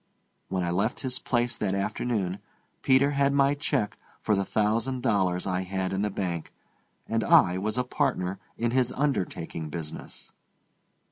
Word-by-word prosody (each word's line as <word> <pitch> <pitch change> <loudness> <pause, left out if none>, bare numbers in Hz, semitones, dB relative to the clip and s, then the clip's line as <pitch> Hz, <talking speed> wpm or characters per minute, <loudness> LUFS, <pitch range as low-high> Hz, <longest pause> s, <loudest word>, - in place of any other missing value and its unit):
When 95 -1 -1
I 85 - -1
left 100 +7 0
his 130 -2 -3
place 120 -1 0
that 100 -2 0
afternoon 100 -1 -1 0.4
Peter 135 +2 +4
had 140 0 +2
my 140 0 +4
check 115 -7 -1 0.2
for 110 - +1
the 100 - +1
thousand 115 +6 0
dollars 95 -7 +1
I 90 -1 0
had 95 0 -2
in 95 - 0
the 105 - +1
bank, 90 -4 -3 0.6
and 115 0 0
I 90 0 +5
was 110 +4 -1
a 125 - +2
partner 125 -9 -1 0.2
in 120 0 0
his 125 -1 +2
undertaking 90 - -2
business. 80 -1 -7
105 Hz, 155 wpm, -27 LUFS, 95-125 Hz, 0.6 s, I